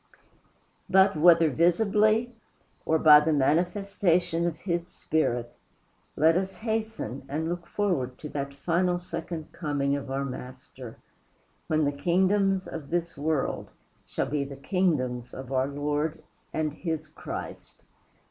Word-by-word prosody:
But 190 0 +5
whether 165 0 +6
visibly 215 - +3 0.5
or 160 - +4
by 150 -1 +8
the 155 +2 0
manifestation 175 +2 +1
of 165 -2 -3
his 170 -2 -2
Spirit, 120 -9 -1 0.6
let 160 +3 +4
us 190 +1 -1
hasten 220 - -3
and 155 +3 -2
look 170 0 -4
forward 150 -13 -1
to 150 - -8
that 140 -1 -4
final 175 +4 +1
second 170 -2 -6
coming 145 -3 -1
of 140 -1 -5
our 135 +1 -1
Master, 130 -2 -9 0.7
when 155 -1 +2
the 145 - +1
kingdoms 190 +5 +1
of 150 -4 -7
this 170 -1 -2
world 150 0 -1 0.3
shall - - -2
be 145 -1 -1
the 140 0 -8
kingdoms 135 -7 -1
of 130 0 -8
our 130 0 +1
Lord 150 +2 -2 0.3
and 155 -2 -1
his 160 -1 -4
Christ. 155 - -8
160 Hz, 130 wpm, -27 LUFS, 140-180 Hz, 0.7 s, by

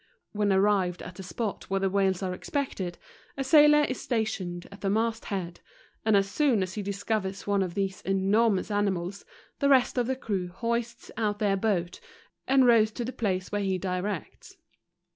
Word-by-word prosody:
When 205 -1 +1
arrived 190 -2 +2
at 180 - -8
the 190 - -9
spot 205 +3 -4
w 195 - 0
here 195 - 0
the - - +1
w 195 0 +3
hales 190 0 -1
are 185 -1 -1
expected, 190 - -3 0.4
a 270 - -1
sailor 295 +1 +6
is 255 -3 -2
'Stationed 190 -7 -2
at 200 - -12
the 195 - 0
mast 225 +2 0
head, 175 -4 -4 0.4
and 220 -2 +4
as 195 0 +2
soon 240 -2 +2
as 185 0 -5
he 210 - -3
discovers 200 0 -3
one 200 -1 +1
of 180 -3 -3
these 195 -1 -2
enormous 195 +2 +1
animals, 200 -2 -1 0.3
the 280 - +2
rest 260 -2 +4
of 240 - 0
the 265 - 0
crew 200 -8 -3
hoist 235 +5 -3
out 210 -2 0
their 205 -2 +1
boat, 190 -4 -1 0.5
and 265 -1 +5
row 235 -2 +7
r 215 - +5
to 225 +2 -5
the 255 - -5
place 185 -5 -2
where 205 0 -1
he 190 -1 0
directs. 185 0 -4
200 Hz, 195 wpm, -28 LUFS, 190-230 Hz, 0.5 s, row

